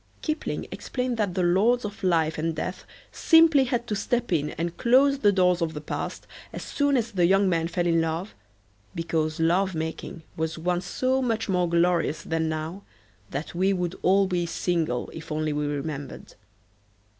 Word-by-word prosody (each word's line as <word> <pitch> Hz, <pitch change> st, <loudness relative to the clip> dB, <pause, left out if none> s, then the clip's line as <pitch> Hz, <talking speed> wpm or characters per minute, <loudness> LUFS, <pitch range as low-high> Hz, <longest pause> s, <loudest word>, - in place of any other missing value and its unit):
Kipling 310 Hz, 0 st, -2 dB
explained 250 Hz, -2 st, -3 dB
that 200 Hz, -5 st, -1 dB
the 185 Hz, -, +1 dB
lords 210 Hz, +8 st, +3 dB
of 210 Hz, 0 st, -7 dB
life 165 Hz, -4 st, +1 dB
and 165 Hz, 0 st, -1 dB
death 180 Hz, +4 st, -5 dB, 0.3 s
simply 325 Hz, -5 st, +5 dB
had 240 Hz, -1 st, -1 dB
to 215 Hz, -, -2 dB
step 240 Hz, +3 st, -1 dB
in 150 Hz, -2 st, +1 dB
and 170 Hz, +1 st, -4 dB
close 270 Hz, +3 st, +4 dB
the 205 Hz, -5 st, +4 dB
doors 180 Hz, -2 st, +2 dB
of 160 Hz, -1 st, -1 dB
the -, -, -3 dB
past 150 Hz, -, -5 dB, 0.3 s
as -, -, -6 dB
soon 285 Hz, -1 st, +1 dB
as 230 Hz, -1 st, -1 dB
the 180 Hz, -4 st, +3 dB
young 195 Hz, +2 st, +4 dB
man 165 Hz, -2 st, +1 dB
fell 175 Hz, +1 st, -1 dB
in 165 Hz, -1 st, +3 dB
love 165 Hz, +5 st, -3 dB, 0.6 s
because 160 Hz, -1 st, -1 dB
love 180 Hz, +3 st, +2 dB
making 160 Hz, +1 st, -5 dB
was 160 Hz, 0 st, -2 dB
once 175 Hz, +2 st, -1 dB
so 260 Hz, +1 st, 0 dB
much 225 Hz, -3 st, -1 dB
more 180 Hz, -3 st, +1 dB
glorious 170 Hz, -2 st, +1 dB
than 160 Hz, -1 st, -1 dB
now 160 Hz, +5 st, -4 dB, 0.5 s
that 140 Hz, +4 st, -5 dB
we 190 Hz, +3 st, +2 dB
would 180 Hz, -2 st, -2 dB
all 195 Hz, +2 st, +4 dB
be 175 Hz, -2 st, -1 dB
single 165 Hz, -6 st, -1 dB
if 160 Hz, 0 st, -9 dB
only 155 Hz, 0 st, -1 dB
we 150 Hz, 0 st, -1 dB
remembered. 145 Hz, -1 st, -5 dB
175 Hz, 180 wpm, -26 LUFS, 160-210 Hz, 0.6 s, simply